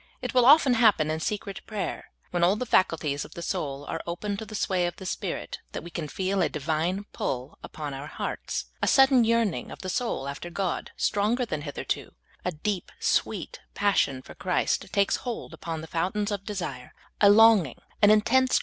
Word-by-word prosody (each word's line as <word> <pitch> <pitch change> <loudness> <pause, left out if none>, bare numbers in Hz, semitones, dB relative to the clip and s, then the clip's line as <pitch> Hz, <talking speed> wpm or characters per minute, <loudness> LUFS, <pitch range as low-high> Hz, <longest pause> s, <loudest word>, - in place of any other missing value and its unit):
It - - -4
will 250 -2 +5
often 285 -2 +7
happen 215 -10 +4
in 160 - -2
secret 200 +3 -3
prayer, 210 -3 -4 0.2
when 175 -1 0
all 180 +4 +5
the 250 - -3
faculties 160 -9 +1
of - - -12
the 170 - -6
soul 145 -7 -3
are 165 - -4
open 200 +4 -3
to 220 - -6
the 215 - -8
swaj^ 185 -3 +1
of 175 - -5
the 190 - -10
Spirit, - - -4
that - - -5
we 170 - -9
can 165 -3 -4
feel 190 +4 -1
a 175 - +2
Divine 160 +6 -1
pull 130 +3 -4
upon 150 -2 -6
our 135 +2 -6
hearts, - - -4 0.2
a - - +1
sudden 270 -2 +6
yearning 225 - +1
of - - -9
the 185 - -3
soul 225 - -2
after 140 +5 -6
God 185 0 -2
stronger 220 +5 +1
than 155 - -3
hitherto; 145 -2 -4 0.3
a 180 - -1
deep, 180 +4 -3
sweet - - 0 0.2
passion 140 -10 +1
for - - -11
Christ 180 +2 0
takes 200 -1 +2
hold 240 -3 -6
upon 165 -2 -5
the - - -7
fountains 190 +6 -1
of 200 -1 -3
desire; 180 -11 -5 0.3
a 200 - +8
longing, 210 - +6 0.2
an 205 - +7
intense 215 0 +6
THE - - -4
DIVINE 260 0 +5
PULL. - - +6
190 Hz, 205 wpm, -27 LUFS, 160-215 Hz, 0.3 s, a